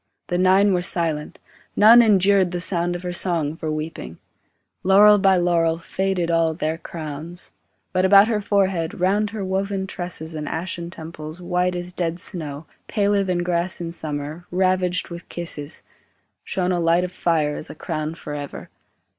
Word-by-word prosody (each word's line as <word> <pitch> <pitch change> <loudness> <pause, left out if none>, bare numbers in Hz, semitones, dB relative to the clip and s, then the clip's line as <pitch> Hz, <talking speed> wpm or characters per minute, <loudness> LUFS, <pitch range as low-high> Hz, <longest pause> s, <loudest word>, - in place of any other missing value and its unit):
the 175 - 0
nine 190 +2 +4
were 180 - +1
silent, 165 -1 -2 0.4
None 230 +3 +8
endured 200 -3 +4
the 175 0 -3
sound 175 0 +1
of 175 - -6
her 180 0 -3
song 165 -4 0
for 160 -1 -4
weeping; 155 - -5 0.7
Laurel 205 +2 +7
by 190 -1 +4
laurel, 170 -2 +2
Faded 180 0 -1
all 165 -1 +2
their 160 0 -2
crowns; 160 +2 -7 0.4
but 185 0 +2
about 200 +2 +7
her 215 -2 0
forehead, 190 -5 0
Round 205 +4 +2
her 205 -2 -5
woven 190 +1 -1
tresses 175 -4 -4
and 150 -1 -5
ashen 170 0 -4
temples 160 -1 -8
White 180 0 0
as 175 0 -5
dead 170 -1 -2
snow, 155 -5 -6 0.2
paler 205 -1 +1
than 180 -2 -1
grass 175 0 0
in 170 -1 -4
summer, 155 +1 -5
Ravaged 185 0 0
with 170 -1 -9
kisses, 160 -4 -3 0.6
Shone 185 -2 -1
a 175 - 0
light 170 +1 +3
of 180 - -3
fire 155 -5 0
as - - -4
a - - -8
crown 155 0 -4
for 150 - -8
ever. 145 -1 -7
175 Hz, 165 wpm, -22 LUFS, 165-190 Hz, 0.7 s, None